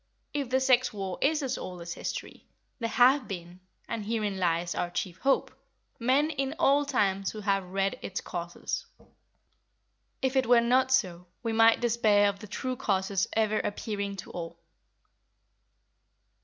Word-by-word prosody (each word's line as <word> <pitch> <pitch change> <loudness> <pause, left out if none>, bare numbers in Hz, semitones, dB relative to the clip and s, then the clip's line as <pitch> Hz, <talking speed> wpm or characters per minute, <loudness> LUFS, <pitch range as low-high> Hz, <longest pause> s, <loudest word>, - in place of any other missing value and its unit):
If 285 -4 -2
the 260 +1 +3
sex 255 -2 +3
war 195 -4 -5
is 300 +1 +2
as 265 -1 -2
old 180 -1 -7
as 170 0 -5
history, - - -6 0.3
there 230 -2 -1
have 260 +3 +4
been—and 185 +4 -8
herein 210 -3 -2
lies 170 -1 0
our 175 - -2
chief 175 +1 -4
hope—men 270 +2 0
in 275 0 -2
all 290 -3 +4
times 195 -8 +1
who 215 - -7
have 195 -2 0
read 195 +1 -1
its 190 - -4
causes. 175 -1 -5 1.3
If 265 0 -1
it 260 -3 +2
were 245 0 +7
not 255 +2 +3
so, 180 -9 +1 0.2
we 230 -1 -1
might 225 +1 +5
despair 215 -4 +4
of 200 -1 -5
the 215 - -9
true 255 +5 -3
causes 195 -5 0
ever 215 -1 +2
appearing 200 -1 -3
to - - -11
all. 170 -1 -6
215 Hz, 150 wpm, -29 LUFS, 190-255 Hz, 1.3 s, were